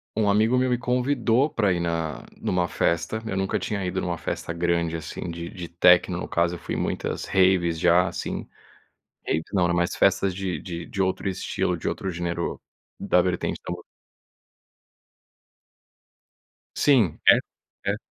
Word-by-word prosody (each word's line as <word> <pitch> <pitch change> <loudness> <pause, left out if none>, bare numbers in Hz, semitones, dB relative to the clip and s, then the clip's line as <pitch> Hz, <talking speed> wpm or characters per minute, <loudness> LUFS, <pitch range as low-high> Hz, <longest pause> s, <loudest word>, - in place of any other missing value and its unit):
um 105 -2 +2
amigo 110 +5 +3
meu 130 0 +2
me 125 - +2
convidou 125 +2 +1
pra 105 -8 +1
ir 85 - 0
na 85 -2 -2
numa 90 -1 0
festa. 85 +7 -1
Eu 95 -3 -3
nunca 95 0 0
tinha 100 -3 -3
ido 95 +1 -2
numa 85 -1 -2
festa 85 - -4
grande, 85 -1 0
assim, 80 +2 -6
de 85 0 -6
de 90 -3 -8
techno. 90 +1 +4
No - - -4
caso, 85 +1 +1
eu - - -9
fui - - -4
em - - -2
muitas - - -2
raves 90 -3 +3
já, 90 +3 +4
assim. - - -4 0.8
Raves 80 +1 0
não, 90 -3 +3
era 85 0 +1
mais 85 0 +1
festas 95 -1 +2
de 95 -2 -3
de 85 -2 -6
de 100 - -5
outro 95 +1 0
estilo, 95 - -1
de - - -2
outro 95 - -3
gênero, 85 0 -3 0.4
da 90 - +3
vertente 90 -1 -2
da - - -3
música. - - -11 2.9
Sim. 120 - +3
E - - +11
e - - +1 0.5
essa 105 - -2
90 Hz, 170 wpm, -25 LUFS, 85-100 Hz, 2.9 s, E